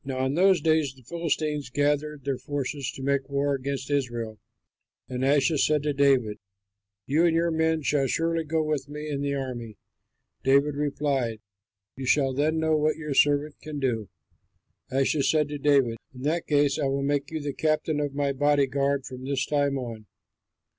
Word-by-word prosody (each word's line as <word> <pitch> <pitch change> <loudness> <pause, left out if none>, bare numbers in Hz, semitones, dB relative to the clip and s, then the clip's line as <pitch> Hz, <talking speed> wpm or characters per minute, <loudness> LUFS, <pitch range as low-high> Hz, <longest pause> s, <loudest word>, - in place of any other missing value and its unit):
Now 130 -1 -2
in 130 - 0
those 185 +1 +4
days 155 -4 +2
the 130 - -19
Philistines 155 -1 -2
gathered 145 +2 0
their 135 -1 -2
forces 140 0 -3
to 135 - -8
make 140 0 0
war 140 0 +1
against 140 +1 -3
Israel. 120 -6 -2 0.7
And 125 0 -3
Achish 140 +1 +3
said 150 -2 +1
to 150 -1 0
David, 135 -6 +2 0.7
"You 155 +5 +3
and 165 - +2
your 170 0 +2
men 160 -1 +1
shall 140 -1 +1
surely 165 +4 0
go 160 +1 0
with 150 -2 -2
me 150 +1 -6
in 140 -1 -2
the 140 0 -1
army." 120 -6 -5 0.7
David 140 +2 +4
replied, 140 -5 -1 0.6
"You 130 -1 -6
shall 135 -1 +3
then 150 +4 +1
know 160 0 +2
what 155 +1 +2
your 150 -3 -4
servant 145 +1 +2
can 150 -1 -6
do." 115 -7 -1 0.8
Achish 135 +2 +1
said 155 -2 +2
to 145 -1 -5
David, 135 -5 +3 0.2
"In 125 - -9
that 165 +4 -1
case 145 -2 +2
I - - 0
will 135 0 0
make 140 0 0
you 160 - -3
the 145 -1 -4
captain 155 0 0
of 145 -2 -2
my 140 -1 0
body 145 +1 +3
guard 140 0 0
from 130 0 -8
this 135 -1 -1
time 145 -2 +1
on." 115 -4 -6
140 Hz, 180 wpm, -26 LUFS, 135-150 Hz, 0.8 s, those